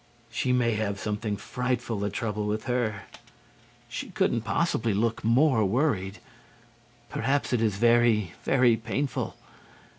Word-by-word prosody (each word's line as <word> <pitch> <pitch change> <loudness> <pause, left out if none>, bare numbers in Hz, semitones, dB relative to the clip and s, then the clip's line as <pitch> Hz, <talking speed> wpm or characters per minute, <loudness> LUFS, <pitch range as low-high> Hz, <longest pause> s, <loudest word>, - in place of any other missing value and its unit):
She 125 +2 0
may 125 -2 +2
have 105 -2 -2
something 105 0 -2
frightful 120 0 -2
the 100 0 -1
trouble 105 0 -3
with 105 +1 -2
her. 120 -5 -1 0.8
She - - -6
couldn't 115 - +1
possibly 115 - 0
look 115 +2 0
more 120 +1 +4
worried. 105 -3 0 0.9
Perhaps 140 -1 0
it 120 - +2
is 110 -4 +1
very, 115 -4 +3
very 125 -3 +4
painful. 120 +5 -3
115 Hz, 125 wpm, -27 LUFS, 105-125 Hz, 0.9 s, more